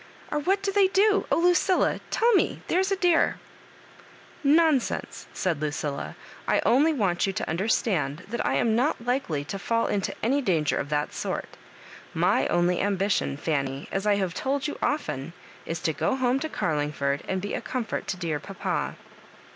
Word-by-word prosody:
— - - -22
or 300 - 0
what 385 +6 +1
do 395 - 0
they 395 -1 +4
do? 400 +2 +3
— - - -24
Oh, - - +4
Lucilla, 355 +2 +3
tell 470 +1 +3
me, 385 - +1
there's 380 +2 +2
a - - +3
dear 355 -3 +3
I" - - -23 0.4
"Nonsense," 300 -2 +2
said 170 -6 -1
Lucilla, 145 -1 -3 0.3
"I - - +3
only 290 +7 +4
want 195 - +1
you 195 - -1
to - - -3
understand 170 - 0
that 235 +3 -3
I - - +1
am 225 -2 +2
not 245 -1 0
likely 240 - -1
to 195 - -5
fall 230 +3 0
into 200 -2 -1
any 270 +6 +2
danger 165 - +1
of 145 - -3
that 150 0 -1
sort - - -4 0.6
My - - +2
only 175 +1 +2
ambition, 195 -7 0
Fanny, 140 -2 -2
as 195 +2 -1
I 205 - +4
have 190 -4 -1
told 275 +5 -1
you 295 - -5
often, 170 - -2 0.3
is 165 - -3
to 160 - 0
go - - 0
home 260 0 +1
to 315 - -3
Oarlingford 145 - -1
and 190 - -1
be 205 +2 -4
a - - -2
comfort 230 0 -3
to 180 - -2
dear 165 -4 -2
papa." 195 +4 -3
205 Hz, 185 wpm, -26 LUFS, -, 0.6 s, they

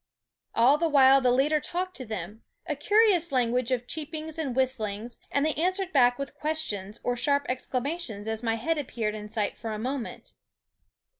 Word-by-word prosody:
All 260 +6 +5
the 335 0 +2
while 270 -2 +6
the 250 -1 +3
leader 285 +5 +3
talked 365 +3 -3
to 255 - -6
them, 210 +1 -6 0.2
a 305 -3 -2
curious 405 0 +3
language 250 -1 +1
of 250 -2 0
cheep 310 +4 -5
ings 315 +1 -5
and 275 -6 -2
whistlings; 235 -3 -1
and 280 +1 +1
they 310 - +1
answered 370 +4 -1
back 245 -3 +5
with 275 0 -5
questions 235 -10 -3
or 245 - 0
sharp 285 +3 +1
exclamations 255 -3 -3
as 220 0 -2
my 225 -2 0
head 315 +8 -1
appeared 230 -6 -2
in 210 -1 -7
sight 215 -2 -2
for 225 - -4
a 215 - -3
moment. 255 +2 -5
260 Hz, 180 wpm, -27 LUFS, 230-310 Hz, 0.2 s, while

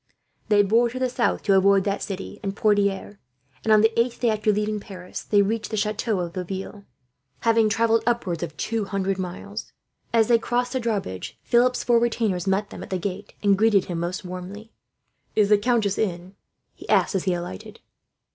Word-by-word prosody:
They 205 -1 +5
bore 230 +4 +3
to 250 - -7
the 255 -1 0
south 240 -1 0
to 195 - +3
avoid 195 0 +4
that 200 0 -1
city 195 -1 -6
and 195 -1 -4
Poitiers 205 -1 +1 0.5
and, 220 - +1
on 215 -1 +7
the 225 +1 +2
eighth 235 +1 0
day 235 -2 +2
after 215 0 +1
leaving 210 +1 -1
Paris, 185 -3 -8
they 205 -1 +3
reached 220 +2 -2
the 215 - -3
chateau 210 -1 0
of 170 -1 -5
Laville, 190 +2 -6 0.6
having 225 -1 +3
travelled 230 +1 +2
upwards 195 -9 0
of 160 -4 -5
two 225 +4 -2
hundred 195 -1 -2
miles. 190 +4 -6 0.4
As 225 -2 +3
they 235 -1 +4
crossed 245 +2 -1
the 260 - 0
drawbridge, 205 - -3
Philip's 250 +1 +2
four 240 -1 +4
retainers 220 -6 0
met 195 +2 0
them - - -8
at - - -8
the 185 - -1
gate, 200 +3 -5
and 200 -1 +5
greeted 210 -2 +3
him 175 -2 -4
most 175 +2 -3
warmly. 185 +5 -8 0.6
"Is 210 -2 +3
the 210 - +6
countess 215 -3 +1
in?" 180 -2 -2 0.4
he - - -14
asked, - - +3
as 190 -1 -1
he 185 -2 +1
alighted. 175 - -7
205 Hz, 195 wpm, -24 LUFS, 190-225 Hz, 0.6 s, on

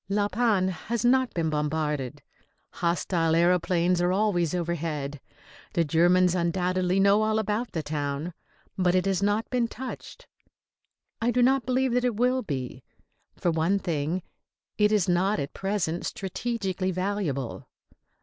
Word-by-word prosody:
La 205 0 +1
Panne 205 -4 +1
has 215 +7 -3
not 260 +1 +3
been 160 -2 0
bombarded. 150 -3 -2 0.5
Hostile 170 -1 0
aëroplanes 175 +1 +2
are 175 0 +2
always 185 -4 +1
overhead. 155 -5 -3 0.5
The 170 - +2
Germans 175 +3 +4
undoubtedly 180 +1 0
know 200 +2 +5
all 215 0 +1
about 220 +3 -1
the 160 - -2
town; 145 +2 -3 0.5
but 180 -1 +3
it 185 0 +2
has 195 -1 +1
not 205 +2 +1
been 245 -2 +1
touched. 255 +3 -8 1.0
I 230 - +2
do 245 0 +3
not 260 -1 +3
believe 255 0 +1
that 250 0 +2
it 245 -3 +1
will 250 +3 +2
be. 130 - -5 0.5
For 175 - 0
one 165 +5 +1
thing, 170 -1 -2 0.5
it 210 0 +3
is 210 -4 +2
not 185 +4 +2
at 140 0 -4
present 190 -4 -2
strategically 195 -2 -3
valuable. 185 - -2
185 Hz, 140 wpm, -27 LUFS, 165-210 Hz, 1.0 s, know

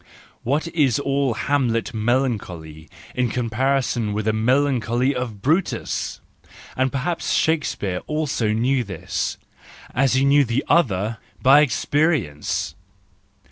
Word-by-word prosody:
What 145 +7 0
is 145 -9 +2
all 140 -3 0
Hamlet 120 -6 0
melancholy 105 - -2 0.2
in 125 -1 0
comparison 120 -1 0
with 105 0 -2
the 110 - +2
melancholy 125 +1 +1
of 120 -6 -5
Brutus!— 165 +7 -1 0.5
and 130 0 +1
perhaps 145 +5 -2
Shakespeare 145 - 0
also 150 -8 -1
knew 125 +4 +1
this, 95 -6 -4 0.6
as 130 0 +2
he 135 +1 +3
knew 140 +1 +5
the 120 +1 -1
other, 110 - +1 0.2
by 135 +3 +6
experience! 140 - 0
125 Hz, 110 wpm, -22 LUFS, 110-140 Hz, 0.6 s, by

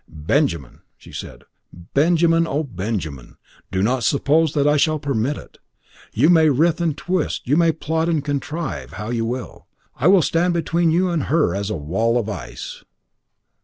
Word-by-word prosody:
"Benjamin!" 80 - -1 0.2
she - - -15
said, - - -8 0.5
"Benjamin! 165 +2 +3
Oh, 150 +2 -1
Benjamin! 95 - -5 0.3
Do 95 0 -1
not 125 +3 +1
suppose 150 +3 +2
that 145 -1 +2
I 150 - +4
shall 155 +1 +2
permit 140 -1 -1
it. - - -14 0.5
You 130 +8 +3
may 160 -2 +5
writhe 160 +5 +2
and 160 -4 0
twist, 175 -2 -2
you 140 - +3
may 165 0 +4
plot 160 +1 -2
and 155 -4 0
contrive 140 - -4
how 105 +6 -5
you 115 -2 -1
will, 125 +2 -6 0.3
I 135 - +1
will 185 -2 +6
stand 170 +3 +1
between 170 +1 +1
you 180 +3 +2
and 165 -5 -1
her 155 +2 +2
as 100 +1 -3
a 105 - -2
wall 95 +11 0
of 110 -3 -2
ice." 85 -12 -7
145 Hz, 170 wpm, -21 LUFS, 110-165 Hz, 0.5 s, will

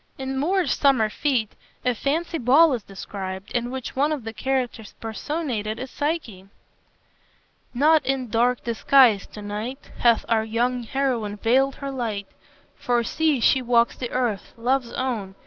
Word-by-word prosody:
In 265 0 -4
Moore's 335 +2 +1
"Summer 260 -6 +3
Fete" 250 -7 -1 0.3
a 250 - +3
fancy 320 +7 -1
ball 280 +6 +5
is 240 - -2
described, 195 -1 -7
in 240 0 -1
which 260 -1 -6
one 285 +3 +2
of 295 -6 -3
the 225 0 -6
characters 245 -1 -2
personated 225 -2 -3
is 255 +2 -6
Psyche 290 - -3 0.6
"... - - -39
not 315 -1 +5
in 260 -1 -1
dark 240 +2 +1
disguise 235 -2 +4
to 210 - -10
night 220 +7 -6
Hath 235 -2 +3
our 225 -1 +2
young 240 +3 0
heroine 235 -4 -1
veiled 260 +5 +2
her 275 -1 -5
light; 225 -6 -3 0.5
For 240 -1 +1
see, 310 +2 +1
she 260 +3 +4
walks 235 -1 +2
the 245 - -5
earth, 240 -6 -2
Love's 245 +1 0
own. 220 -7 -3
245 Hz, 155 wpm, -24 LUFS, 225-270 Hz, 0.6 s, ball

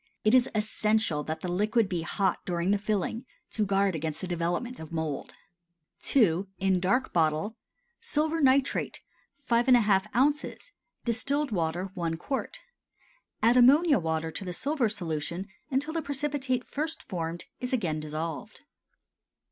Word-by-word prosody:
(It 215 - +4
is 255 -1 +5
essential 215 -5 +1
that 155 0 -4
the 185 - -3
liquid 210 +5 +2
be 180 -3 -2
hot 185 +2 0
during 175 +1 0
the 205 - +2
filling, 210 +3 -1 0.3
to 215 -2 0
guard 195 -1 +2
against 155 -1 -3
the 185 - -3
development 175 +8 -2
of 160 0 -9
mould.) 160 -4 -3 0.8
II. 195 -7 +4
(In 190 -1 +2
Dark 220 +9 +1
Bottle.) 160 +6 +1 0.5
Silver 320 -7 0
nitrate 270 0 +2 0.5
5½ 235 -5 +4
oz. 295 - 0 0.3
Distilled 275 +5 +1
water 175 0 -1
1 165 -3 -2
qt. 270 +10 -3 0.9
Add 235 +3 +5
ammonia 285 +4 +6
water 160 -1 -2
to 195 - -6
the 180 -1 -4
silver 270 - 0
solution 170 -1 -3 0.2
until 290 +3 -1
the 330 - -1
precipitate 280 -3 -1
first 310 +3 -3
formed 170 -2 -4
is 250 - -3
again 175 -12 0
dissolved. 155 +1 -5
205 Hz, 140 wpm, -28 LUFS, 170-255 Hz, 0.9 s, ammonia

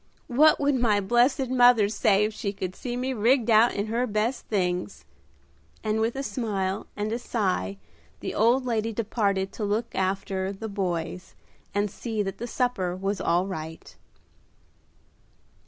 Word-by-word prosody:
What 305 +5 +6
would 285 0 +2
my 235 -5 +2
blessed 240 +6 +2
mother 245 -4 +5
say 210 -1 +2
if 215 +1 -1
she 205 -1 -3
could 185 -2 -5
see 245 -1 -4
me 260 +1 -1
rigged 240 +1 +2
out 220 +2 +5
in 200 - -1
her 235 +3 -1
best 220 +4 -1
things?" 180 - -2 0.8
and 215 0 0
with 230 +3 0
a 275 - -3
smile 205 -7 -2
and 210 +1 -2
a 235 - -2
sigh 185 - -1 0.4
the - - -4
old 240 +4 +3
lady 225 -2 -1
departed 200 -3 0
to 220 - -6
look 210 +3 -1
after 190 0 -1
"the 200 +3 -6
boys," 180 -3 -3 0.4
and 205 -1 +1
see 220 -2 -3
that 195 -1 -5
the 240 - -4
supper 225 -8 -1
was 195 +1 -2
all 175 +2 +2
right. 160 -4 -7
215 Hz, 155 wpm, -26 LUFS, 195-240 Hz, 0.8 s, What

